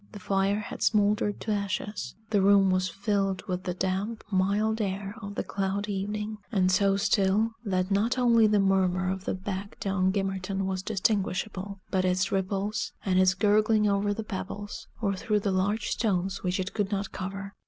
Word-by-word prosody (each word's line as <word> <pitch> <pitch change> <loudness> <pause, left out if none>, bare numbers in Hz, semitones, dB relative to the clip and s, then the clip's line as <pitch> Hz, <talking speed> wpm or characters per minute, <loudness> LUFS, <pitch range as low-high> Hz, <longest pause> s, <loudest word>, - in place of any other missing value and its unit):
The 205 - -8
fire 195 +2 +1
had 210 - -8
smoldered 205 -1 +2
to 220 - -2
ashes; 205 0 -3 0.2
the 205 -2 +3
room 195 -1 +5
was 185 0 +1
filled 195 0 -1
with 185 -2 -4
the 180 - -2
damp, 190 +4 -2
mild 205 +4 +1
air 195 0 -3
of 200 0 -7
the - - -1
cloudy 200 +1 -2
evening; 210 +2 -3
and 185 -4 +3
so 195 +1 +3
still, 200 +2 +2
that 185 -2 -1
not 220 +6 +2
only 235 -3 +5
the 210 -1 +3
murmur 185 -1 +2
of 190 0 -5
the - - -1
beck 195 +1 -5
down 190 -1 +1
Gimmerton 195 0 -2
was 190 -1 -2
distinguishable, 200 -1 -1
but 190 -1 +2
its 185 0 +1
ripples, 195 +2 -1
and 185 -2 +3
its 185 -1 +4
gurgling 210 +1 +3
over 200 0 +1
the 220 +2 -3
pebbles, 205 +1 -6
or 200 -3 +1
through 210 +1 0
the 200 - 0
large 200 +3 0
stones 190 -3 0
which 180 +1 -1
it 185 +1 -3
could 205 -3 -1
not 200 -1 -2
cover. 195 +1 -5
195 Hz, 180 wpm, -28 LUFS, 190-210 Hz, 0.2 s, room